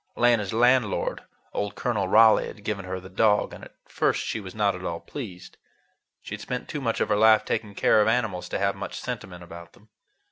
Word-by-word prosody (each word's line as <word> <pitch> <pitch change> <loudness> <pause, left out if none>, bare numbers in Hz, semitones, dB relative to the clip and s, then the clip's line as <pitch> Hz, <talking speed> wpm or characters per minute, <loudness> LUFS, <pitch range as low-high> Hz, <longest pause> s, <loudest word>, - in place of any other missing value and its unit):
Lena's 115 -5 +2
landlord, 120 -1 +2 0.3
old 105 0 -3
Colonel 105 -6 -1
Raleigh, 110 +3 +6
had 105 - -11
given 100 -2 -3
her 95 0 -4
the 95 - -11
dog, 105 +2 +2
and - - -11
at - - -13
first - - 0
she - - -3
was 95 -2 -9
not 105 -2 +2
at 90 - -8
all 85 -2 -3
pleased. 95 - -9 0.7
She - - -8
had - - -6
spent 125 0 -5
too 150 - -5
much 115 -3 -1
of - - 0
her 105 - +3
life 110 +1 +5
taking 105 -2 -3
care 105 - +4
of 105 - +2
animals 110 -7 0
to - - -2
have 100 0 0
much - - -6
sentiment 90 -2 -6
about 85 0 -11
them. 110 +2 -22
105 Hz, 215 wpm, -25 LUFS, 95-110 Hz, 0.7 s, Raleigh